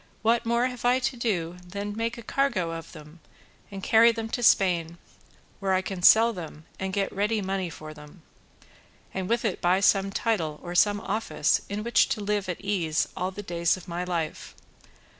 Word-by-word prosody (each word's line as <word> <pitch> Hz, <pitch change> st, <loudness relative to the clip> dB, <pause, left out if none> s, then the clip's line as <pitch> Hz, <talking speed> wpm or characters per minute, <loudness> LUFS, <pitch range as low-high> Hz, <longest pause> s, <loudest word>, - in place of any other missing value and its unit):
What 230 Hz, +1 st, +2 dB
more 235 Hz, +1 st, +2 dB
have 250 Hz, -1 st, -5 dB
I 245 Hz, +1 st, +4 dB
to 260 Hz, 0 st, -1 dB
do 180 Hz, -8 st, -2 dB
than 200 Hz, +3 st, -5 dB
make 230 Hz, +2 st, -2 dB
a 235 Hz, -, -9 dB
cargo 220 Hz, -10 st, 0 dB
of 165 Hz, -1 st, -7 dB
them 155 Hz, +1 st, -13 dB, 0.5 s
and 195 Hz, -1 st, -8 dB
carry 230 Hz, +2 st, +6 dB
them 225 Hz, -1 st, -5 dB
to 245 Hz, -, -3 dB
Spain, 175 Hz, -6 st, +3 dB, 0.6 s
where 190 Hz, -1 st, +1 dB
I 185 Hz, -, 0 dB
can 190 Hz, -2 st, -5 dB
sell 225 Hz, +5 st, +7 dB
them 160 Hz, -4 st, -9 dB
and 190 Hz, 0 st, -3 dB
get 195 Hz, 0 st, -1 dB
ready 210 Hz, +3 st, 0 dB
money 190 Hz, -2 st, -2 dB
for 155 Hz, -1 st, -9 dB
them, 150 Hz, +3 st, -15 dB, 0.9 s
and 190 Hz, -1 st, -3 dB
with 235 Hz, 0 st, +1 dB
it 200 Hz, -, -1 dB
buy 180 Hz, +2 st, +3 dB
some 195 Hz, 0 st, +3 dB
title 175 Hz, -8 st, -1 dB
or 175 Hz, -, -6 dB
some 205 Hz, +3 st, +3 dB
office 200 Hz, -7 st, 0 dB
in 205 Hz, +1 st, -3 dB
which 235 Hz, 0 st, +3 dB
to -, -, -1 dB
live 205 Hz, -1 st, -1 dB
at 180 Hz, -, -4 dB
ease 175 Hz, -6 st, 0 dB
all 185 Hz, 0 st, -2 dB
the 205 Hz, +2 st, -8 dB
days 170 Hz, -1 st, 0 dB
of 185 Hz, -, -13 dB
my 175 Hz, +1 st, -3 dB
life? 170 Hz, -3 st, -4 dB
195 Hz, 195 wpm, -26 LUFS, 175-225 Hz, 0.9 s, sell